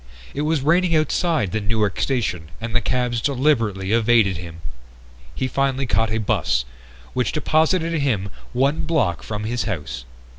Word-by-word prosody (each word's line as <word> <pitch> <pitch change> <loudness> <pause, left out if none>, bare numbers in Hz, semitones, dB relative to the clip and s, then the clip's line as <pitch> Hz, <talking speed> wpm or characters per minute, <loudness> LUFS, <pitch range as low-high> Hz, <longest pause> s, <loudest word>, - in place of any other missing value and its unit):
It 145 - -2
was 155 -1 +1
raining 170 +3 +3
outside 155 - +1
the 110 - -1
Newark 105 -1 0
station 105 - -1
and 115 +1 -4
the 120 - +3
cabs 120 0 0
deliberately 115 -9 +1
evaded 115 -4 +4
him. 85 -1 -9 0.7
He 130 - -1
finally 135 +1 0
caught 115 -2 +1
a 110 - 0
bus, 65 - +1 0.5
which 125 -6 0
deposited 160 +2 +2
him 110 -9 0 0.2
one 135 +5 +1
block 110 - +1
from 105 -1 -5
his 120 +2 -1
house. 75 - -4
120 Hz, 150 wpm, -22 LUFS, 105-140 Hz, 0.7 s, evaded